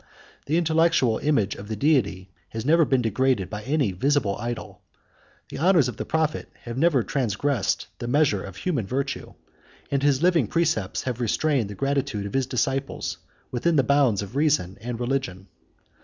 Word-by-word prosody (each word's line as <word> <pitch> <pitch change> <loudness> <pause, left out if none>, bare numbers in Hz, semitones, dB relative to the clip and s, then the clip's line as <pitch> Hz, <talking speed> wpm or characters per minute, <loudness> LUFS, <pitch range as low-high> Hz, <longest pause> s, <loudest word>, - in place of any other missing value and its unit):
The 155 +4 +2
intellectual 160 -8 +3
image 115 -10 +1
of 100 - -9
the 110 - -3
Deity 100 - +1 0.2
has 110 +1 -5
never 165 +2 +5
been 130 -3 +1
degraded 115 -2 +1
by 105 0 -4
any 135 -2 0
visible 120 0 +1
idol; 105 -4 -5 0.7
the - - -7
honors 170 -4 +4
of 125 - -5
the - - -4
prophet 160 -1 -1
have 120 -1 -6
never 140 -3 +3
transgressed 130 -1 -1
the 120 - -4
measure 130 -7 +2
of 95 - -9
human 130 - -2
virtue; 135 +4 -3 0.6
and 140 -1 +1
his 140 +1 +2
living 175 -2 +3
precepts 155 - 0
have 125 -2 -3
restrained 125 0 +1
the 100 - -7
gratitude 135 -3 -1
of 100 - -6
his 135 -1 +1
disciples 135 +2 -2 0.3
within 160 +7 +1
the 140 - +4
bounds 130 -7 +3
of 100 +5 -10
reason 140 - +1
and 120 0 -5
religion. 120 -7 -2
130 Hz, 170 wpm, -25 LUFS, 110-145 Hz, 0.7 s, never